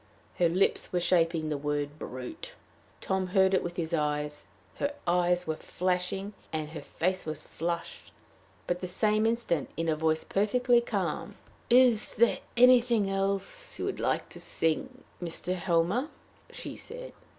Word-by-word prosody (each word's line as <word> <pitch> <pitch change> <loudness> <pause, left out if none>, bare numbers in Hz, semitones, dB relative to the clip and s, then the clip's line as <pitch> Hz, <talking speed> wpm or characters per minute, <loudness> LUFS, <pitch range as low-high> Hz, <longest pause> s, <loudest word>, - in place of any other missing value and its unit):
Her 175 -2 +4
lips 185 +4 +1
were 180 - +1
shaping 165 -3 +2
the 150 -2 -2
word 145 +1 -2
brute! 125 -2 -7 0.5
Tom 190 -1 0
heard 190 +1 +3
it 190 - +4
with 175 0 -5
his 165 -1 -2
eyes; 150 -1 -1 0.3
her 285 +1 -1
eyes 175 0 +2
were 160 - -1
flashing, 185 +2 -1 0.2
and 155 -1 -3
her 160 - -6
face 185 +2 -1
was 155 0 -5
flushed. 170 +1 -4 0.5
But 175 0 -2
the 185 - -3
same 215 +4 +2
instant, 225 - 0
in 165 0 -1
a 160 - +2
voice 160 0 +1
perfectly 240 +4 +3
calm 235 - -2 0.3
"Is 245 -3 +5
there 235 +2 +4 0.2
anything 240 -4 +5
else 200 - -2
you - - -3
would - - -3
like - - 0
to - - -10
sing, 255 +11 -1 0.2
Mr. 175 +1 -3
Helmer?" 180 - +1 0.4
she - - -7
said. - - -8
180 Hz, 150 wpm, -29 LUFS, 165-215 Hz, 0.5 s, Is